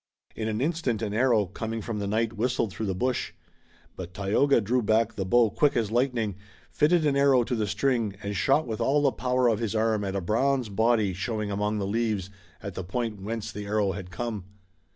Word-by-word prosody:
In 110 Hz, -, -3 dB
an 110 Hz, +1 st, -2 dB
instant, 140 Hz, -7 st, -1 dB
an 105 Hz, -2 st, -2 dB
arrow, 115 Hz, -2 st, +3 dB
coming 110 Hz, +5 st, -5 dB
from 110 Hz, -1 st, -4 dB
the 100 Hz, -, -2 dB
night, 110 Hz, +2 st, 0 dB
whistled 115 Hz, -1 st, 0 dB
through 110 Hz, -, -3 dB
the 95 Hz, -, -1 dB
bush. 125 Hz, +5 st, -1 dB, 0.6 s
But 90 Hz, 0 st, -8 dB
Tayoga 105 Hz, +8 st, +3 dB
drew 120 Hz, +4 st, +1 dB
back 110 Hz, +1 st, +2 dB
the 95 Hz, -2 st, -3 dB
bow 115 Hz, +1 st, +4 dB
quick 145 Hz, +5 st, +2 dB
as 110 Hz, -3 st, 0 dB
lightning, 120 Hz, -5 st, 0 dB, 0.3 s
fitted 155 Hz, +2 st, +3 dB
an 145 Hz, -2 st, +2 dB
arrow 140 Hz, -3 st, +4 dB
to 120 Hz, -, -3 dB
the 110 Hz, -3 st, 0 dB
string 110 Hz, 0 st, 0 dB
and 100 Hz, 0 st, -3 dB
shot 145 Hz, +7 st, +2 dB
with 110 Hz, -2 st, -4 dB
all 145 Hz, +2 st, +2 dB
the 140 Hz, -, +4 dB
power 125 Hz, +2 st, +1 dB
of 110 Hz, -3 st, +2 dB
his 115 Hz, -2 st, -2 dB
arm 110 Hz, -1 st, +1 dB
at 95 Hz, -1 st, -3 dB
a -, -, +1 dB
bronze 125 Hz, +5 st, +1 dB
body 110 Hz, -1 st, +2 dB
showing 105 Hz, +2 st, -3 dB
among 105 Hz, +1 st, -1 dB
the 100 Hz, -, -2 dB
leaves 105 Hz, -2 st, -1 dB, 0.3 s
at 100 Hz, -2 st, -5 dB
the 95 Hz, -, -5 dB
point 105 Hz, +2 st, -3 dB
whence 110 Hz, +2 st, -4 dB
the 105 Hz, 0 st, -7 dB
arrow 105 Hz, -1 st, +1 dB
had 95 Hz, -2 st, -7 dB
come. 105 Hz, 0 st, -4 dB
110 Hz, 215 wpm, -27 LUFS, 100-125 Hz, 0.6 s, bow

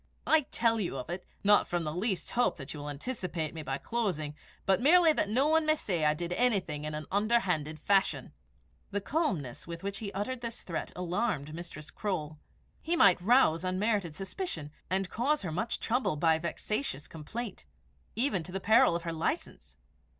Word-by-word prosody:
I 315 Hz, -3 st, +4 dB
tell 230 Hz, -1 st, +2 dB
you 175 Hz, -9 st, -2 dB
of 130 Hz, +6 st, -5 dB
it, 180 Hz, +1 st, -5 dB, 0.2 s
not 205 Hz, 0 st, +5 dB
from 175 Hz, -1 st, -1 dB
the 150 Hz, -1 st, -3 dB
least 190 Hz, +1 st, -2 dB
hope 245 Hz, -6 st, +2 dB
that 135 Hz, -2 st, -7 dB
you 150 Hz, -, -7 dB
will 145 Hz, 0 st, -5 dB
anticipate 165 Hz, -, -4 dB
me 160 Hz, -, -5 dB
by 135 Hz, -2 st, -2 dB
closing, 180 Hz, -9 st, -2 dB, 0.3 s
but 195 Hz, +3 st, +3 dB
merely 325 Hz, +3 st, +6 dB
that 205 Hz, -, 0 dB
no 260 Hz, +7 st, +3 dB
one 320 Hz, +1 st, +4 dB
may 310 Hz, 0 st, +3 dB
say 175 Hz, -, -1 dB
I 150 Hz, 0 st, +4 dB
did 175 Hz, +2 st, -3 dB
anything 185 Hz, -11 st, +1 dB
in 155 Hz, 0 st, -3 dB
an 155 Hz, 0 st, -5 dB
underhand 190 Hz, -8 st, +1 dB
fashion." 180 Hz, -7 st, +1 dB, 0.6 s
The 205 Hz, -, -1 dB
calmness 195 Hz, -, -2 dB
with 170 Hz, +2 st, -7 dB
which 200 Hz, 0 st, -3 dB
he 205 Hz, -3 st, -5 dB
uttered 235 Hz, +6 st, -3 dB
the 235 Hz, -, -2 dB
threat 180 Hz, -7 st, -5 dB
alarmed 180 Hz, -4 st, -1 dB
Mistress 160 Hz, -2 st, -8 dB
Croale. 155 Hz, -7 st, -3 dB, 0.4 s
He 340 Hz, -, 0 dB
might 185 Hz, -, +6 dB
rouse 190 Hz, -6 st, +4 dB
unmerited 185 Hz, -2 st, 0 dB
suspicion, 190 Hz, -, -4 dB, 0.2 s
and 190 Hz, +1 st, 0 dB
cause 275 Hz, +8 st, 0 dB
her 175 Hz, -, -3 dB
much 220 Hz, +8 st, -2 dB
trouble 245 Hz, -7 st, 0 dB
by 160 Hz, +1 st, +3 dB
vexatious 170 Hz, -, -3 dB
complaint, 195 Hz, -, -7 dB, 0.5 s
even 225 Hz, -5 st, +1 dB
to 180 Hz, -, -8 dB
the 195 Hz, -, -2 dB
peril 220 Hz, -4 st, +5 dB
of 170 Hz, -, -3 dB
her 165 Hz, -1 st, -3 dB
license. 160 Hz, -, -3 dB
185 Hz, 185 wpm, -31 LUFS, 160-230 Hz, 0.6 s, merely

